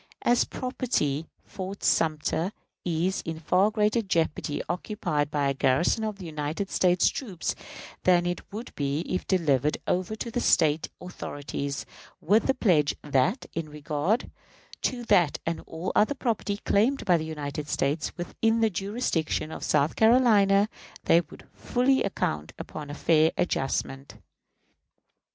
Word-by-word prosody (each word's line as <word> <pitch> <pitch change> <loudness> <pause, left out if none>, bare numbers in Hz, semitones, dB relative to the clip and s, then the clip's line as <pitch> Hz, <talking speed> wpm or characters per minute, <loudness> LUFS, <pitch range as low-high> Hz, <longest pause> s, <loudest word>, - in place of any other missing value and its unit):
As 240 0 +4
property, 165 - -2 0.2
Fort 195 +1 -7
Sumter 160 +4 +1 0.3
is 175 +2 0
in 160 -1 -5
far 185 +5 +3
greater 215 +2 +2
jeopardy 165 -6 -1
occupied 175 -4 -2
by 145 -2 0
a 140 - +1
garrison 135 - +2
of 215 -2 -3
United 160 +2 -4
States 180 -1 +3
troops 195 -11 -2 0.5
than 175 -1 +4
it 175 0 -2
would 220 +4 -7
be 145 +1 -1
if 185 +1 -3
delivered 150 -6 +2
over 185 +4 -1
to 230 +2 -5
the 245 - -1
State 155 -8 +3
authorities, 145 -5 -5 0.3
with 210 +7 +3
the 270 - +2
pledge 165 - +3
that, 150 - +1
in 160 -2 -4
regard 150 +8 -1 0.5
to 245 -2 -1
that 180 -10 +3
and 165 0 -2
all 165 +3 -4
other 220 +7 +3
property 220 -5 -1
claimed 230 +7 +1
by 180 - +5
the 160 - 0
United 150 -2 -5
States 145 +4 -1
within 225 +6 0
the 225 -1 +3
jurisdiction 195 -6 -1
of - - -7
South 150 +1 +2
Carolina, 215 -4 +5 0.4
they 170 - +5
would - - -14
fully 265 +2 +1
account, 75 - -2
upon 150 -2 -7
a 145 - -5
fair 160 0 +3
adjustment. 135 -3 -2
175 Hz, 140 wpm, -27 LUFS, 150-210 Hz, 0.5 s, by